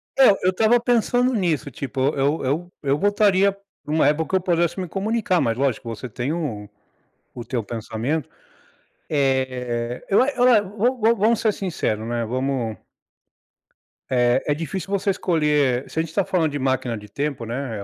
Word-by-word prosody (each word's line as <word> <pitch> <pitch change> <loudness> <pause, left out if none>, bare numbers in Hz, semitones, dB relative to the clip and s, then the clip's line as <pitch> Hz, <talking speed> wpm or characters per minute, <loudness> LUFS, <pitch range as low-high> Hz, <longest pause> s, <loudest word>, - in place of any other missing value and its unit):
É, 265 -1 +7 0.2
eu 185 - +5
estava 220 +5 +3
pensando 245 +1 +2
nisso, 170 - 0
tipo 135 +1 -5 0.2
eu 140 +3 0
eu 165 +7 -2
eu 140 0 +1
voltaria 200 0 +3 0.3
numa 155 -1 +2
época 150 +2 +1
que - - 0
eu 190 - +2
pudesse 175 -1 0
me 185 - -3
comunicar, 200 0 0
mas 115 0 0
lógico, 130 -3 -1
você 115 +3 -6
tem 130 +7 -3
um 115 -12 -4 0.7
o 120 - -7
teu 120 -2 -2
pensamento. 115 +7 -3 0.8
Eh, 130 -4 -1
eu 200 - +5
a 260 - +3
eu 245 -7 +3
vo 245 +5 +2
vo 225 +2 +4
vamos 220 +2 +2
ser 215 -2 +2
sincero, 115 - -2
né? 120 0 -2
Vamos 125 -2 -2 1.3
É 120 0 +3
é 145 - +3
difícil 165 +5 -5
você 200 0 0
escolher. 150 -8 +1
Se 160 - -3
a - - +4
gente 165 - -5
está 195 +4 0
falando 165 -4 0
de 145 - -3
máquina 130 -3 -1
de 105 0 -12
tempo, 140 0 -3
né? 120 -1 -4
É, 100 - -6
150 Hz, 175 wpm, -22 LUFS, 125-195 Hz, 1.3 s, É